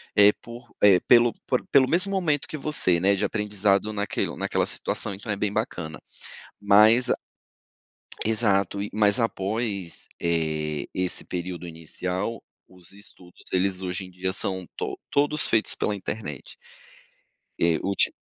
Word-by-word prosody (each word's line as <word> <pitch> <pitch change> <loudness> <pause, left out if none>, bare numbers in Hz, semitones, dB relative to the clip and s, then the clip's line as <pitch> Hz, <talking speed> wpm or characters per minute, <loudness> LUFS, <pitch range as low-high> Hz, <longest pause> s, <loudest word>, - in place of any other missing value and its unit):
eh 105 0 +8
por, 120 0 -12
eh 95 -3 +7
pelo 120 -1 +5
por 125 - 0
pelo 130 -2 +5
mesmo 185 +4 +1
momento 160 -7 0
que - - -6
você, 135 - +2
né, 100 +2 +3
de - - -1
aprendizado 105 -1 +1
naquelo 105 -1 -2
naquela - - 0
situação. 100 - -2
Então 105 +2 -6
é - - 0
bem 100 0 -1
bacana. 85 -7 -4 0.6
Mas 110 +5 +5
a - - +3 1.1
exato, 100 -3 +1
e 105 - -5
mas 105 0 +3
após, 100 -4 -3
eh, 80 -3 -1
esse 90 -1 -1
período 90 0 -5
inicial, 90 +6 -4 0.3
os 90 -2 -11
estudos, 95 -3 -14
eles 95 0 +1
hoje 90 +1 -3
em 90 - -12
dia 95 +1 -3
são 95 -2 -1
to - - -4
todos 145 +2 +2
feitos 115 -1 +3
pela 105 - -1
internet. 95 - -6 1.1
Eh, 85 -1 +3
uti 100 0 +1
100 Hz, 145 wpm, -25 LUFS, 90-110 Hz, 1.1 s, eh